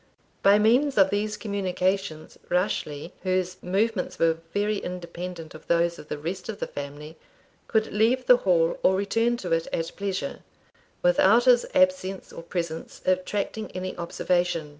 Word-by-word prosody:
By 200 +1 +6
means 245 +6 +3
of 195 -1 +5
these 210 +1 -1
communications 190 -4 -2
Rashleigh, 175 -4 -1
whose 185 -1 -1
movements 195 +2 -1
were 165 -1 +2
very 210 +1 0
independent 175 -2 -7
of 155 - -13
those 170 0 +2
of 150 - -11
the 150 - -4
rest 180 +6 -5
of 215 - -5
his - - -3
family, 145 +2 -7 0.5
could 220 -1 0
leave 235 +5 +2
the 250 - +7
Hall 170 -6 +2
or 190 - +4
return 230 +5 +1
to 180 -7 -6
it 165 0 +1
at 165 0 -3
pleasure, 200 +6 -3 0.6
without 240 - +5
his 245 -1 +5
absence 275 -9 +1
or - - -7
presence 170 -1 -5
attracting 200 +4 -1
any 185 0 -4
observation. 175 -2 -1
185 Hz, 150 wpm, -26 LUFS, 170-210 Hz, 0.6 s, the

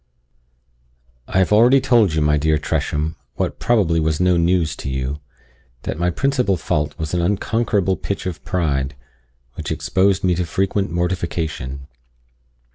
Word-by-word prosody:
I - - -2
have 95 +2 +3
already 120 +5 +6
told 115 -10 +3
you, 80 - +1
my 75 0 +3
dear 75 +1 +2
Tresham, 75 +2 -2 0.2
what - - -2
probably 95 -9 +2
was 80 -1 0
no 90 0 +3
news 85 -3 +1
to - - -5
you, 65 +2 -3 0.6
that - - -4
my 90 +1 +2
principal 125 -1 +1
fault 75 -2 -2
was 80 -1 -4
an 90 - +1
unconquerable 100 0 0
pitch 100 - -4
of 90 -3 -5
pride, 70 -7 -1 0.6
which - - -5
exposed 95 0 +1
me 90 -1 +3
to 90 +1 0
frequent 95 +2 0
mortification. 85 -6 -3
85 Hz, 145 wpm, -20 LUFS, 75-95 Hz, 0.6 s, already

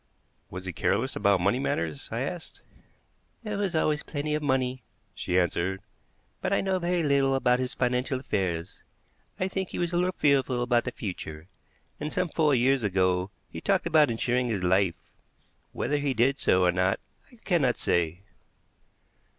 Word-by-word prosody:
"Was 90 +1 -7
he 90 - -4
careless 115 +11 0
about 100 -3 +3
money 100 +7 +2
matters?" 80 - -2
I - - -2
asked. - - -5 0.8
"There 210 -2 -3
was 195 -4 -1
always 155 -1 +1
plenty 150 0 -3
of 150 - 0
money," 130 -2 0 0.3
she 90 - -1
answered, 90 +1 0 0.6
"but - - -1
I - - +3
know 190 -1 0
very 175 -1 0
little 140 -2 +3
about 125 -2 +3
his 130 0 -3
financial 125 +1 0
affairs. 90 -8 -3 0.6
I 185 - +1
think 190 -1 -3
he - - -6
was 175 -1 -1
a - - +2
little 180 +1 +1
fearful 135 -4 +2
about 120 -1 +2
the 125 - -2
future, 80 -8 -6 0.5
and 150 +1 -3
some 180 - -1
four 150 -3 +2
years 130 +2 +3
ago 95 -2 +1 0.2
he - - -8
talked 195 -2 +1
about 155 -4 +4
insuring 120 +2 0
his 105 -6 -2
life. 95 0 +3 0.8
Whether 145 +4 -1
he 140 -2 -1
did 130 +5 +2
so 90 0 +4
or 90 - +4
not, 95 +2 +1 0.3
I - - -17
cannot 170 - +1
say." 85 +1 0
125 Hz, 170 wpm, -27 LUFS, 95-150 Hz, 0.8 s, about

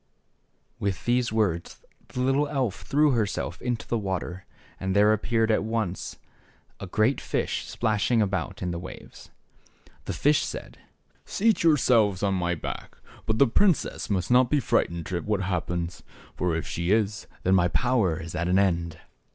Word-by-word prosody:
With 100 -2 -2
these 120 -1 +2
words 100 -7 -1 0.2
the 125 - -4
little 135 +3 +2
elf 130 -9 -2
threw 150 0 +3
herself 105 -6 -1
into 120 -2 -3
the 120 - 0
water, 95 -2 -4 0.3
and 95 0 -2
there 105 +1 +5
appeared 110 +1 +1
at 110 - +2
once 110 -5 -3 0.6
a 95 - -6
great 110 +8 +1
fish - - -2
splashing 110 +1 +1
about 95 -3 -1
in 90 - -1
the 85 - -4
waves. 90 - -11 0.8
The - - -3
fish 150 +1 +3
said, - - -7 0.4
Seat 220 +1 +1
yourselves 115 - +3
on 100 -1 +2
my 90 -2 0
back. 80 - -7 0.3
But 110 -1 +1
the 140 - +6
princess 180 - +1
must 95 +1 -1
not 125 0 +5
be 150 - +3
frightened 85 - 0
at 85 -1 -2
what 105 -2 0
hap 95 -3 -1
pens; 85 -1 -3 0.3
for 90 -2 0
if 80 - -2
she 85 +1 -3
is, 105 0 +1 0.2
then 95 - +3
my 90 -2 +4
power 95 -1 +1
is 80 -1 -7
at 85 0 -1
an 90 +1 +3
end." 85 -4 +1
105 Hz, 165 wpm, -26 LUFS, 90-120 Hz, 0.8 s, the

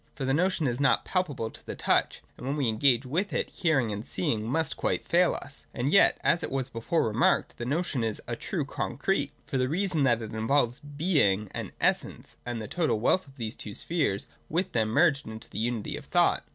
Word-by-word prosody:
For 135 - -3
the 135 - +1
notion 175 +1 +1
is 125 +1 -1
not 135 - +3
palpable 145 -12 -1
to - - -14
the - - -6
touch, - - +1
and 125 - -8
when 140 - 0
we 140 - +1
are - - +2
engaged 120 +3 +3
with 175 +10 -1
it, - - -1
hearing 135 - +1
and 105 +1 -4
seeing 110 +1 -2
must 160 +3 0
quite - - -1
fail 175 0 +3
us. 140 0 -9
And 130 +3 0
yet, 200 - +6
as 170 - +3
it - - -3
was 135 -2 -2
before 115 +6 0
remarked, 110 +4 +1
the 120 - -3
no 155 +7 +1
tion 135 -9 -2
is 110 -2 -1
a - - -2
true - - -3
concrete; - - -1
for 135 - -2
the 130 0 +1
reason 180 -1 +1
that 120 -3 +2
it 110 - -7
involves 120 +2 +1
Being 145 - +1
and - - -5
Essence, - - -1
and 120 -1 -2
the 110 - -5
total 160 - 0
wealth 185 +9 +2
of 135 - -17
these 115 -2 -4
two 105 - -8
spheres 145 - -1 0.3
wdth 180 +4 0
them, 110 -2 +1
merged 145 +3 +3
in 110 0 -6
the - - -4
unity 115 -1 -2
of - - -10
thought. - - +2
135 Hz, 225 wpm, -28 LUFS, 115-160 Hz, 0.3 s, yet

